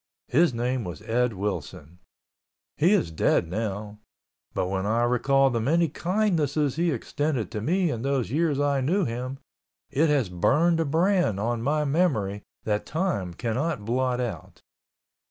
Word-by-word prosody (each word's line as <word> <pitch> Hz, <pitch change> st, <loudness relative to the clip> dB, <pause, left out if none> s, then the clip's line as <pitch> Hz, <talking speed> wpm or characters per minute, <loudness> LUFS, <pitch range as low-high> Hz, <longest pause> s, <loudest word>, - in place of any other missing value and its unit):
His 165 Hz, +3 st, +4 dB
name 120 Hz, +1 st, -1 dB
was 85 Hz, -5 st, -7 dB
Ed 125 Hz, +1 st, +1 dB
Willson. 90 Hz, -4 st, -5 dB, 0.8 s
He 170 Hz, +6 st, +3 dB
is 145 Hz, -, +2 dB
dead 80 Hz, +1 st, +2 dB
now—but 105 Hz, -1 st, -6 dB
when 95 Hz, +1 st, -2 dB
I 115 Hz, +2 st, +2 dB
recall 135 Hz, +3 st, +3 dB
the 115 Hz, -1 st, 0 dB
many 165 Hz, +7 st, +2 dB
kindnesses 160 Hz, -6 st, 0 dB
he 170 Hz, +2 st, +1 dB
extended 135 Hz, -, -2 dB
to 105 Hz, -, -4 dB
me 175 Hz, -, +1 dB
in 115 Hz, -, -4 dB
those 135 Hz, -3 st, -1 dB
years 150 Hz, -1 st, +1 dB
I 140 Hz, -1 st, +1 dB
knew 175 Hz, +8 st, +1 dB
him, 125 Hz, +3 st, -4 dB, 0.5 s
it 155 Hz, +3 st, +2 dB
has 140 Hz, -7 st, +2 dB
burned 155 Hz, -, +2 dB
a 165 Hz, -, +1 dB
brand 170 Hz, -, +2 dB
on 115 Hz, +2 st, -1 dB
my 150 Hz, +4 st, +1 dB
memory 135 Hz, -, +1 dB, 0.2 s
that 105 Hz, -1 st, -1 dB
time 155 Hz, -, -2 dB
cannot 125 Hz, -, -2 dB
blot 125 Hz, +2 st, 0 dB
out. 90 Hz, -6 st, -5 dB
125 Hz, 150 wpm, -26 LUFS, 105-155 Hz, 0.8 s, His